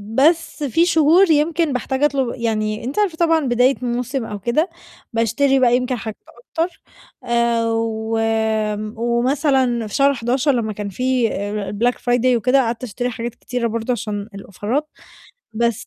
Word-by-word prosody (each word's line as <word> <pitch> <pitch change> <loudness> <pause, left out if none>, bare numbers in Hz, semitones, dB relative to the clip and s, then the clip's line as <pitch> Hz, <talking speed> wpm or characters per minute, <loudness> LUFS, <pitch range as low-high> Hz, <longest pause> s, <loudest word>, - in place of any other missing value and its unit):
بس 320 +3 +2
في 290 +5 +2
شهور 335 +2 +4
يمكن 310 0 +2
باحتاج 265 +3 -2
أطُلب 270 -4 +1
يعني 215 -2 -2
أنتِ 265 - -3
عارفة 385 -6 +1
طبعًا 330 -1 +3
بداية 250 +2 +3
موسم 250 +1 -2
أو 210 -2 -6
كده 245 - 0 0.4
باشتري 235 +5 +2
بقى 245 -2 +4
يمكن 250 0 -2
حاجات 220 -2 -6
أكتر 325 +8 -5 0.4
آآ 235 -1 +1
و 225 0 -1
آمم 220 -1 0
ومثلًا 245 0 +1
في 210 - -6
شهر 280 0 +4
11 250 +4 +1
لما 230 -4 -1
كان 205 0 -5
في 250 +3 0
آآ 205 0 -3
الblack 240 +4 +1
friday 245 0 +1
وكده 250 +4 +3
قعدت 235 0 -3
أشتري 245 +1 -3
حاجات 240 0 -5
كتيرة 245 -1 -3
برضه 230 +2 -2
عشان 210 -2 -4
الأوفرات، 215 +10 -3 0.7
بس 235 +1 -1
240 Hz, 155 wpm, -20 LUFS, 225-275 Hz, 0.7 s, شهور